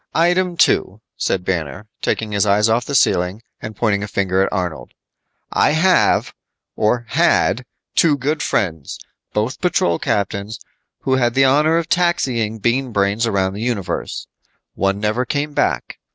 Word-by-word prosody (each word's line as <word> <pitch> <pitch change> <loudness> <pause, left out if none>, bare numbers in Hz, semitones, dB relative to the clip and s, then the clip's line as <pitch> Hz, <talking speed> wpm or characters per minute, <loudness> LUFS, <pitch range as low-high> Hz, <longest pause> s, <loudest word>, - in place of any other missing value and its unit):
"Item 175 +1 +2
two," 100 - +2 0.2
said 90 -1 -1
Banner, 85 0 -3 0.2
taking 110 -1 -1
his 100 -1 +1
eyes 105 +2 +3
off 115 +2 +1
the 140 - -3
ceiling 95 -1 +2 0.2
and 110 0 -7
pointing 100 -2 0
a 105 - -4
finger 95 -2 0
at 95 - 0
Arnold. 85 -9 -4 0.6
"I - - +3
have, 180 +4 +3 0.4
or 120 +3 +1
had, 125 +6 +2 0.3
two 155 -4 +4
good 145 +3 -1
friends 80 -8 -2 0.3
both 110 +5 -2
patrol 90 - +1
captains 100 +2 -2 0.4
who 130 -1 +1
had 120 -2 +1
the 135 0 +5
honor 150 +5 +3
of 170 -1 -1
taxiing 130 -12 0
Bean 120 +4 0
Brains 100 +2 +1
around 95 -3 0
the 105 - -6
universe. 115 -6 -3 0.5
One 100 +1 0
never 110 +4 0
came 145 +4 -2
back. 65 - -1
110 Hz, 150 wpm, -19 LUFS, 100-135 Hz, 0.6 s, the